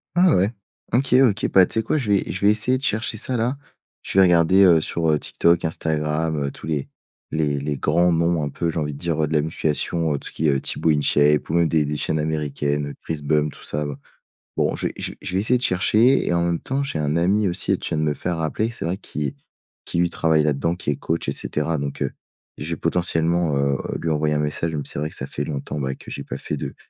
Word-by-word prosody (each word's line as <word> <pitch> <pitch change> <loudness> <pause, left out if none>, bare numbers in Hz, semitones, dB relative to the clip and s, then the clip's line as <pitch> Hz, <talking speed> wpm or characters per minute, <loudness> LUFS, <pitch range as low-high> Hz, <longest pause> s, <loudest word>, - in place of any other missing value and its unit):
Ah 180 -1 +5
ouais! 100 +5 +2 0.4
OK 130 +2 +2
OK, 110 0 -1
bah 95 -1 +7
tu 110 - -2
sais - - +2
quoi 115 +7 0
je 110 -7 -1
vais 100 - +4
je 95 +2 -2
vais 105 - +7
essayer 110 +5 +1
de 130 - -11
chercher 115 -5 -1
ça 130 - -2
là. 120 +4 0 0.5
Je 95 - +1
vais 95 - +8
regarder, 90 +2 +4
heu, 85 -4 +6
sur, 80 +1 -1
heu, 75 - +3
TikTok, 85 +3 +1
Instagram, 80 0 -1
heu, 70 -1 -2
tous - - -10
les 75 -4 -2 0.4
les 75 -2 0
les 75 0 -3
grands 90 +5 +3
noms 85 -1 +1
un 75 - -2
peu, 85 +4 -2
j'ai 80 - -4
envie 75 -1 -2
de 70 - -10
dire, 80 -3 0
heu, - - +1
de 80 - -4
la 75 - +3
musculation, 80 +1 -1
heu, 70 - -2
tout - - -8
ce - - -15
qui 80 - 0
est - - +4
heu, 70 - +1
Tibo 80 - +1
InShape 75 0 +3
ou 80 - 0
même 85 -1 +4
des 80 -1 +2
des 75 0 -3
chaînes 80 +1 -1
américaines, 75 -2 -2
Chris 80 -2 -4
Bump, 75 0 +1
tout - - -15
ça 75 0 -3
ba 70 -1 -6 0.6
bon, - - +1
je - - -3
vais - - -6
je - - -2
vais - - -23
je 90 - -4
vais 95 - +2
essayer 115 +5 +2
de 125 - -7
chercher 110 +8 +3
et - - +1
en 85 0 +1
même 85 -1 0
temps, 135 +2 -2
j'ai 110 - -3
un 75 +2 0
ami 95 +4 +2
aussi, 85 - +2
tu - - -4
viens - - -2
de 80 - 0
me 75 - +1
faire 85 +4 -3
rappeler, 80 +8 -1
c'est 115 - -6
vrai 90 +3 -1
qui 75 -7 -4 0.5
qui - - -4
lui 85 0 +2
travaille 80 -1 +2
là-dedans 75 +3 0
qui 85 -5 -2
est - - -1
coach 80 +4 -3
et - - +1
cetera 75 +1 -2
donc 70 0 -3
heu, - - -2 0.5
je - - -5
vais - - -1
potentiellement, 85 -3 +2
heu, 70 0 +1 0.2
lui 80 - -1
envoyer 75 0 +1
un - - +1
message, 75 +2 -1
même 75 -2 -3
si - - -2
c'est - - -4
vrai 75 +1 -2
que - - -9
ça - - -4
fait 70 - -4
longtemps, 75 0 -4
bah, 65 -1 -2
que - - -12
j'ai 70 - -5
pas - - -6
fait - - -4
de - - -5
80 Hz, 270 wpm, -22 LUFS, 75-90 Hz, 0.6 s, vais